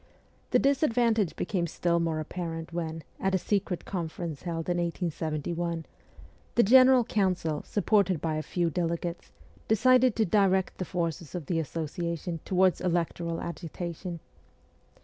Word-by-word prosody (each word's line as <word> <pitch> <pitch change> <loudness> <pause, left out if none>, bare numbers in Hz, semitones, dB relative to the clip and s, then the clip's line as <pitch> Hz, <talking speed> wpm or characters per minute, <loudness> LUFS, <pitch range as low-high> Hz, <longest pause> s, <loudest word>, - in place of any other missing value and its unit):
The - - +4
disadvan 250 -4 +3
tage 200 -7 0
became 175 -4 -1
still 170 +1 0
more 165 -2 0
apparent 165 0 -5
when, 165 -2 -3 0.2
at 190 0 +1
a - - +4
secret 195 -1 -1
conference 165 -4 -4
held 165 -2 -4
in 175 -1 +1
1871, 170 -1 -2 0.7
the 235 - +6
general 255 +3 +7
council, 185 -8 0
supported 200 -4 +2
by 160 0 -1
a - - -1
few 170 +1 -1
delegates, 170 +1 -3 0.4
decided 255 +2 +4
to 220 - +2
direct 190 0 +2
the 185 - -2
forces 170 -2 -3
of 175 -4 -4
the 165 +1 0
Association 165 +2 -3
towards 185 -1 +3
electoral 170 -1 -1
agitation. 170 0 -5
175 Hz, 135 wpm, -28 LUFS, 165-190 Hz, 0.7 s, general